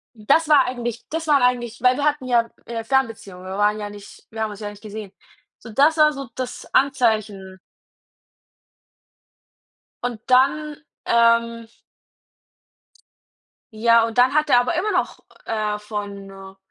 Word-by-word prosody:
das 285 Hz, +9 st, +1 dB
war 285 Hz, -3 st, +6 dB
eigentlich 240 Hz, -2 st, -5 dB
das 320 Hz, 0 st, -4 dB
waren 285 Hz, -3 st, +4 dB
eigentlich 240 Hz, -1 st, 0 dB
weil 250 Hz, 0 st, +4 dB
wir 285 Hz, -, -3 dB
hatten 295 Hz, -3 st, 0 dB
ja 235 Hz, -2 st, +1 dB, 0.2 s
'ne 230 Hz, -1 st, -4 dB
Fernbeziehung, 225 Hz, -7 st, -2 dB
wir 190 Hz, +1 st, -6 dB
waren 210 Hz, +1 st, +1 dB
ja 205 Hz, -1 st, -5 dB
nicht 205 Hz, -1 st, -13 dB
wir 220 Hz, 0 st, -7 dB
haben 220 Hz, -1 st, -1 dB
uns 205 Hz, -, -10 dB
ja 210 Hz, -, -5 dB
nicht 205 Hz, 0 st, -13 dB
gesehen. 210 Hz, -2 st, -8 dB, 0.5 s
So, 235 Hz, -, -12 dB
das 285 Hz, +8 st, +3 dB
war 305 Hz, -1 st, +5 dB
so 275 Hz, -3 st, -7 dB
das 255 Hz, -1 st, -6 dB
Anzeichen. 215 Hz, -8 st, 0 dB, 2.5 s
Und 245 Hz, -3 st, -3 dB
dann, 285 Hz, +4 st, +2 dB, 0.3 s
ähm 230 Hz, 0 st, +2 dB, 2.1 s
ja, 230 Hz, +1 st, +4 dB
und 230 Hz, +1 st, -6 dB
dann 250 Hz, +2 st, +4 dB
hat 305 Hz, 0 st, +1 dB
er 245 Hz, -, +6 dB
aber 255 Hz, +8 st, -1 dB
immer 395 Hz, +6 st, 0 dB
noch, 360 Hz, -2 st, -1 dB, 0.3 s
äh, 215 Hz, -1 st, -2 dB
von 205 Hz, -2 st, -6 dB
'ner 195 Hz, 0 st, -12 dB
235 Hz, 150 wpm, -21 LUFS, 210-270 Hz, 2.5 s, war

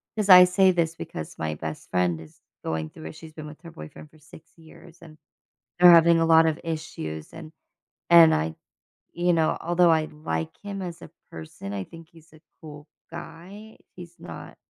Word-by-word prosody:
'cause 210 Hz, -2 st, -2 dB
I 180 Hz, 0 st, +10 dB
say 185 Hz, +1 st, +3 dB
this 165 Hz, -2 st, -1 dB
because 80 Hz, -, -8 dB
my 80 Hz, -1 st, -4 dB
best 80 Hz, 0 st, -8 dB
friend 90 Hz, -3 st, -1 dB
is 80 Hz, -, -17 dB, 0.2 s
going 80 Hz, -1 st, -4 dB
through 80 Hz, -, -11 dB
it, 80 Hz, -, -10 dB
she's 160 Hz, -1 st, -13 dB
been 155 Hz, -1 st, -9 dB
with 150 Hz, -, -12 dB
her 170 Hz, -, -11 dB
boyfriend 75 Hz, -, -12 dB
for 155 Hz, -, -23 dB
6 160 Hz, +2 st, -18 dB
years, 165 Hz, +1 st, -17 dB
and 155 Hz, -2 st, -15 dB, 0.6 s
they're 180 Hz, 0 st, +8 dB
having 170 Hz, 0 st, +6 dB
a 165 Hz, -, +2 dB
lot 160 Hz, 0 st, +5 dB
of 160 Hz, 0 st, -2 dB
issues. 155 Hz, -, -6 dB
And 160 Hz, -1 st, -11 dB, 0.6 s
and 170 Hz, -2 st, +7 dB
I, 80 Hz, +1 st, -2 dB, 0.6 s
you 175 Hz, 0 st, +1 dB
know, 160 Hz, -1 st, +1 dB
although 175 Hz, 0 st, +3 dB
I 160 Hz, -1 st, +2 dB
like 80 Hz, -, -6 dB
him 200 Hz, -1 st, -6 dB
as 175 Hz, -2 st, -7 dB
a -, -, -12 dB, 0.2 s
person, 80 Hz, +5 st, -9 dB
I 95 Hz, -1 st, -4 dB
think 165 Hz, -, -14 dB
he's 165 Hz, -1 st, -21 dB
a 155 Hz, -, -18 dB, 0.2 s
cool 150 Hz, -1 st, -12 dB, 0.2 s
guy, 180 Hz, +6 st, -11 dB, 0.2 s
he's 175 Hz, -1 st, -12 dB
not -, -, -11 dB
160 Hz, 190 wpm, -24 LUFS, -, 0.6 s, I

